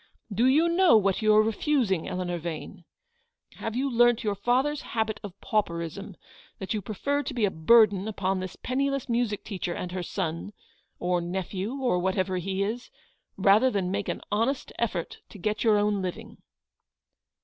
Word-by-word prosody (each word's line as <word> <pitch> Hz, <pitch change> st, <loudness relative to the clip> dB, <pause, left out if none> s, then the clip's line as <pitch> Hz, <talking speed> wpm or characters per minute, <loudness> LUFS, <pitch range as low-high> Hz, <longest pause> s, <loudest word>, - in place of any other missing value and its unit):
Do 235 Hz, +5 st, +3 dB
you 305 Hz, +6 st, +4 dB
know 340 Hz, -6 st, +5 dB
what 195 Hz, -1 st, +1 dB
you 215 Hz, 0 st, +4 dB
are 215 Hz, -, +6 dB
refusing, 220 Hz, -, 0 dB
Eleanor 180 Hz, -2 st, -3 dB
Vane? 170 Hz, +1 st, -7 dB, 0.7 s
Have 225 Hz, 0 st, -4 dB
you 265 Hz, +3 st, 0 dB
learnt 240 Hz, -2 st, +3 dB
your 210 Hz, -2 st, 0 dB
father's 255 Hz, +8 st, +1 dB
habit 220 Hz, -1 st, -2 dB
of 200 Hz, -2 st, -9 dB
pauperism, 185 Hz, -1 st, -2 dB, 0.4 s
that 190 Hz, -, -4 dB
you 210 Hz, -, -2 dB
prefer 280 Hz, +9 st, -1 dB
to 285 Hz, -, -5 dB
be 230 Hz, -4 st, +2 dB
a 195 Hz, -, 0 dB
burden 200 Hz, +3 st, +4 dB
upon 195 Hz, -3 st, -1 dB
this 185 Hz, -1 st, -6 dB
penniless 275 Hz, +1 st, -1 dB
music 235 Hz, -4 st, -1 dB
teacher 185 Hz, -4 st, -4 dB
and 180 Hz, -, -5 dB
her 185 Hz, 0 st, -3 dB
son, 170 Hz, +3 st, -4 dB, 0.4 s
or 180 Hz, 0 st, 0 dB
nephew, 190 Hz, +5 st, -3 dB
or 255 Hz, -9 st, +1 dB
whatever 190 Hz, 0 st, 0 dB
he 190 Hz, +2 st, -1 dB
is, 230 Hz, +5 st, -4 dB, 0.5 s
rather 200 Hz, +6 st, +5 dB
than 195 Hz, -6 st, -1 dB
make 200 Hz, 0 st, -2 dB
an -, -, -3 dB
honest 230 Hz, +6 st, 0 dB
effort 190 Hz, -8 st, -2 dB
to -, -, -12 dB
get 210 Hz, +3 st, -2 dB
your 220 Hz, -3 st, +4 dB
own 205 Hz, -1 st, +1 dB
living 220 Hz, +5 st, -6 dB
205 Hz, 170 wpm, -27 LUFS, 185-235 Hz, 0.7 s, are